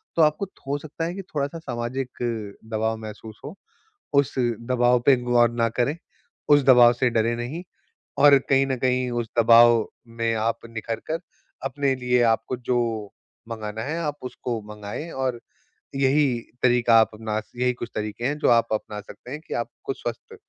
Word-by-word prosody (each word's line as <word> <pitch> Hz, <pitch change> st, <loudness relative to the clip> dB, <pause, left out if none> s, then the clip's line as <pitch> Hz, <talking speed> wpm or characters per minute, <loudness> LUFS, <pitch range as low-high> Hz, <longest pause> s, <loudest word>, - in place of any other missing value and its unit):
तो 165 Hz, -, +3 dB
आपको 155 Hz, +6 st, +2 dB
थो 140 Hz, -6 st, -5 dB
सकता 155 Hz, +2 st, -5 dB
है 170 Hz, -, -3 dB
कि 195 Hz, -, -5 dB
थोड़ा-सा 150 Hz, 0 st, -4 dB
सामाजिक 130 Hz, -2 st, -4 dB, 0.6 s
दबाव 110 Hz, +1 st, 0 dB
महसूस 110 Hz, 0 st, -9 dB
हो। 155 Hz, +7 st, -7 dB, 0.6 s
उस 140 Hz, -1 st, +3 dB
दबाव 120 Hz, +1 st, +2 dB
पे 140 Hz, -, +8 dB
गौर 120 Hz, -1 st, +4 dB
ना 115 Hz, -1 st, +1 dB
करें, 125 Hz, +6 st, 0 dB, 0.5 s
उस 145 Hz, -1 st, +6 dB
दबाव 120 Hz, -2 st, +7 dB
से 125 Hz, +1 st, +1 dB
डरें 115 Hz, +1 st, +1 dB
नहीं 135 Hz, +9 st, -5 dB, 0.6 s
और 145 Hz, -1 st, +8 dB
कहीं 135 Hz, 0 st, +4 dB
न 135 Hz, -1 st, -1 dB
कहीं 125 Hz, 0 st, +1 dB
उस 115 Hz, -, -5 dB
दबाव 115 Hz, 0 st, +6 dB, 0.3 s
में 115 Hz, 0 st, +1 dB
आप 115 Hz, +1 st, 0 dB
निखर 115 Hz, 0 st, -5 dB
कर 165 Hz, -, 0 dB, 0.5 s
अपने 135 Hz, 0 st, 0 dB
लिए 125 Hz, -1 st, +2 dB
आपको 115 Hz, +3 st, -2 dB
जो 125 Hz, 0 st, -1 dB, 0.7 s
मँगाना 110 Hz, -1 st, -5 dB
है 155 Hz, +6 st, -3 dB
आप 150 Hz, -2 st, -2 dB
उसको 120 Hz, -2 st, -4 dB
माँगए 105 Hz, +10 st, -7 dB
और 130 Hz, -2 st, -2 dB, 0.6 s
यही 140 Hz, +2 st, +3 dB, 0.4 s
तरीका 120 Hz, -2 st, +5 dB
आप 110 Hz, -, +2 dB
अपना 110 Hz, 0 st, -3 dB, 0.2 s
यही 125 Hz, 0 st, +1 dB
कुछ 120 Hz, -1 st, -7 dB
तरीके 110 Hz, +2 st, -4 dB
हैं 145 Hz, +3 st, 0 dB
जो -, -, +2 dB
आप 115 Hz, -1 st, +4 dB
अपना 105 Hz, -1 st, -3 dB
सकते 120 Hz, +4 st, -13 dB
हैं 150 Hz, -, -5 dB
कि -, -, -5 dB
आपको 120 Hz, +3 st, -6 dB
स्वस्थ 120 Hz, -3 st, -7 dB
120 Hz, 170 wpm, -24 LUFS, 115-135 Hz, 0.7 s, पे